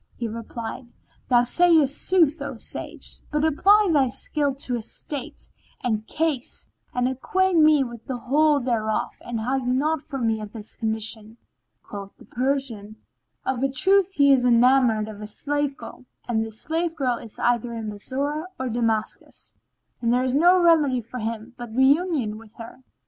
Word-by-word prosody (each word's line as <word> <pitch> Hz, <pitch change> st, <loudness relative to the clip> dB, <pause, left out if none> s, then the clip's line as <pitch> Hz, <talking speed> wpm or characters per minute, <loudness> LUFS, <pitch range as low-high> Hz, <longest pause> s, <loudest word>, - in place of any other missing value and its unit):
"[FN#12] -, -, -42 dB
He 235 Hz, -, -3 dB
replied, 230 Hz, +2 st, -7 dB, 0.4 s
Thou 240 Hz, -2 st, +5 dB
sayest 315 Hz, +1 st, +4 dB
sooth, 330 Hz, -5 st, +2 dB
O 280 Hz, -4 st, -5 dB
sage, -, -, -6 dB
but 300 Hz, +1 st, 0 dB
apply 400 Hz, +7 st, +4 dB
thy 270 Hz, -4 st, +3 dB
skill 285 Hz, +1 st, -1 dB
to 265 Hz, -2 st, -4 dB
his 230 Hz, -2 st, -3 dB
state 285 Hz, -4 st, -6 dB, 0.4 s
and 220 Hz, -3 st, -1 dB
case, 305 Hz, -5 st, -2 dB, 0.2 s
and 250 Hz, 0 st, 0 dB
acquaint 350 Hz, +7 st, +1 dB
me 305 Hz, -2 st, +5 dB
with 235 Hz, -3 st, -9 dB
the 255 Hz, -, -3 dB
whole 290 Hz, +4 st, +3 dB
thereof 230 Hz, -4 st, -1 dB
and 235 Hz, -2 st, -4 dB
hide 255 Hz, +3 st, -1 dB
naught 290 Hz, +5 st, +1 dB
from 275 Hz, -6 st, -4 dB
me 220 Hz, -1 st, 0 dB
of 210 Hz, 0 st, -8 dB
his 215 Hz, -2 st, -9 dB
condition." 220 Hz, 0 st, -1 dB, 0.5 s
Quoth 200 Hz, -1 st, -9 dB
the -, -, -16 dB
Persian, 250 Hz, -5 st, -2 dB, 0.5 s
"Of 265 Hz, -2 st, -1 dB
a 275 Hz, -, +2 dB
truth 380 Hz, +7 st, +3 dB
he 280 Hz, -4 st, +5 dB
is 255 Hz, -2 st, +3 dB
enamoured 245 Hz, -2 st, +4 dB
of 210 Hz, -1 st, -9 dB
a 210 Hz, -, -6 dB
slave 290 Hz, +5 st, -2 dB
girl 255 Hz, -, -11 dB, 0.2 s
and 225 Hz, -2 st, 0 dB
this 220 Hz, -1 st, -7 dB
slave 330 Hz, +1 st, -1 dB
girl 255 Hz, -6 st, 0 dB
is 220 Hz, -, -11 dB
either 240 Hz, 0 st, +1 dB
in 225 Hz, -2 st, -5 dB
Bassorah 280 Hz, -, -3 dB
or 260 Hz, -1 st, -2 dB
Damascus; 230 Hz, -2 st, -3 dB, 0.5 s
and 230 Hz, -1 st, +1 dB
there 250 Hz, +1 st, +2 dB
is 255 Hz, -1 st, 0 dB
no 350 Hz, +5 st, +5 dB
remedy 300 Hz, -7 st, +4 dB
for 235 Hz, +3 st, -8 dB
him 225 Hz, +1 st, -5 dB
but 235 Hz, -2 st, -8 dB
reunion 265 Hz, -5 st, +2 dB
with 225 Hz, -1 st, -17 dB
her." 230 Hz, +3 st, -11 dB
255 Hz, 170 wpm, -24 LUFS, 230-290 Hz, 0.5 s, Thou